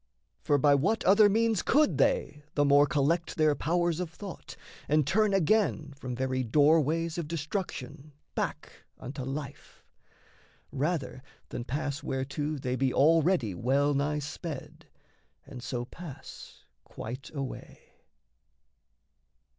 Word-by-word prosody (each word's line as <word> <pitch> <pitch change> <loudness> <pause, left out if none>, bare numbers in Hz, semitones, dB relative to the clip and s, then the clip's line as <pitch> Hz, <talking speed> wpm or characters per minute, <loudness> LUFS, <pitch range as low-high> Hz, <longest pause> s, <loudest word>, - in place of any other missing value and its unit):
For 145 - +2
by 145 +1 +4
what 190 +11 +1
other 205 +2 +6
means 225 0 +2
could 300 +3 +2
they 475 - +1
the 145 - +3
more 145 +1 +5
Collect 165 +2 0
their 155 -1 +3
powers 170 +3 0
of 180 -2 -3
thought 190 +2 -9 0.3
and 150 -1 +3
turn 210 +7 +2
again 185 -5 +1
From 130 -3 -6
very 130 0 -1
doorways 155 +5 +2
of 165 - -4
destruction 150 -3 -5 0.2
Back - - -4
unto 135 +2 -7
life, 135 +2 -7 0.9
rather 140 -3 -2 0.3
than 120 - -5
pass 140 +2 -3
whereto 140 +3 -3
They 130 -2 -2
be 130 0 +1
already 160 - +3
well 140 +9 +1
nigh 145 +2 0
sped 150 0 -7 0.6
and 125 - -9
so 120 -1 -3
Pass 155 +1 -11 0.2
quite 130 +5 -8
away? 135 -2 -6
150 Hz, 125 wpm, -29 LUFS, 135-170 Hz, 0.9 s, other